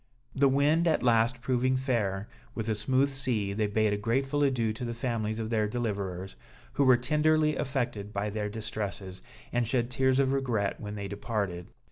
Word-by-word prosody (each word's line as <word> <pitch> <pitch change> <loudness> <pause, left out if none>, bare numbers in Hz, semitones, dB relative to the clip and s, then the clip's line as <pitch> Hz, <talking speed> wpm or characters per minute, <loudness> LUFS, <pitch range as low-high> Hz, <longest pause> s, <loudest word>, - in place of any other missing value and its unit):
The 140 0 +4
wind 150 +5 +3
at 160 - +2
last 120 +1 +3
proving 130 +1 +1
fair, 105 -7 -1 0.3
with 110 -1 -3
a 110 - +2
smooth 130 +6 +1
sea, 120 -7 -1
they 105 +1 0
bade 105 0 +1
a - - 0
grateful 135 +7 0
adieu 125 -6 +2
to 110 - -7
the 120 -1 -3
families 115 -3 -2
of 110 0 -3
their 110 -2 +2
deliverers, 100 -5 -3 0.4
who 140 - +2
were 130 -2 +7
tenderly 155 +3 +2
affected 120 -7 -2
by 105 +1 -2
their 105 0 -2
distresses, 105 -4 -5 0.3
and 120 -1 +1
shed 120 0 0
tears 130 +1 +2
of 135 -1 +3
regret 120 -7 0
when 105 0 -6
they 100 -1 -4
departed. 100 -4 -3
115 Hz, 180 wpm, -29 LUFS, 105-130 Hz, 0.4 s, were